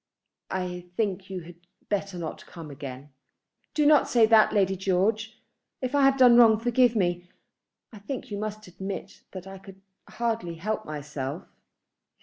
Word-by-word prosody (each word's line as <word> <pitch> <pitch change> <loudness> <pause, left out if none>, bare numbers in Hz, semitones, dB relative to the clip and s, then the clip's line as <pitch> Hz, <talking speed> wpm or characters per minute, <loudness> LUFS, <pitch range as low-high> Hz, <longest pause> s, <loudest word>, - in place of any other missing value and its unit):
"I 180 -1 -4
think 195 -3 -1
you 185 -2 -5
had 170 +1 -13 0.3
better 200 -2 -2
not 165 -2 -6
come 165 -3 -10
again." 135 0 -9 0.6
"Do 300 - +2
not 300 0 +5
say 235 -2 +5
that, 220 -1 +5
Lady 195 -2 +2
George. 200 +4 0 0.4
If 255 +1 -3
I 285 - +3
have 270 0 +4
done 245 -2 +7
wrong, 225 -2 +7
forgive 240 +1 +2
me. 175 -3 -1 0.6
I 215 - -10
think 225 +3 -6
you 200 - -3
must 215 0 -5
admit 190 +2 -7
that 185 -1 -8
I 195 0 -9
could 195 0 -14 0.3
hardly 225 -6 -2
help 215 +5 -3
myself." 150 +2 -5
195 Hz, 155 wpm, -26 LUFS, 175-225 Hz, 0.6 s, done